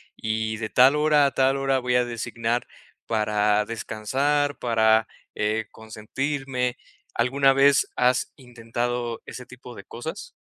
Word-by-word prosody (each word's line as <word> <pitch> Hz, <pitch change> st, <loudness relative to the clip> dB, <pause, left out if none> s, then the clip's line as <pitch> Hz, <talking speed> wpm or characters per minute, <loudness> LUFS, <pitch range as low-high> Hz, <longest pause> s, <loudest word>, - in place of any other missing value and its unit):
y 110 Hz, 0 st, -2 dB
de 110 Hz, 0 st, -4 dB
tal 130 Hz, +3 st, +5 dB
hora 150 Hz, -1 st, +4 dB
a 140 Hz, -, -2 dB
tal 135 Hz, +1 st, +2 dB
hora 135 Hz, -1 st, +1 dB
voy 125 Hz, -1 st, -1 dB
a 125 Hz, 0 st, +3 dB
designar 120 Hz, 0 st, -3 dB, 0.4 s
para 105 Hz, -1 st, +1 dB
descansar, 135 Hz, +7 st, -1 dB
para 110 Hz, -2 st, +2 dB, 0.3 s
eh, 110 Hz, +1 st, -1 dB
consentirme.", 125 Hz, +3 st, -4 dB, 0.4 s
¿alguna 135 Hz, +3 st, +3 dB
vez 140 Hz, +1 st, +4 dB
has 125 Hz, 0 st, +1 dB
intentado 120 Hz, -1 st, -4 dB
ese 125 Hz, -, -9 dB
tipo 125 Hz, -1 st, -12 dB
de 100 Hz, -, -10 dB
cosas? 160 Hz, -, -8 dB
120 Hz, 130 wpm, -24 LUFS, 110-135 Hz, 0.4 s, tal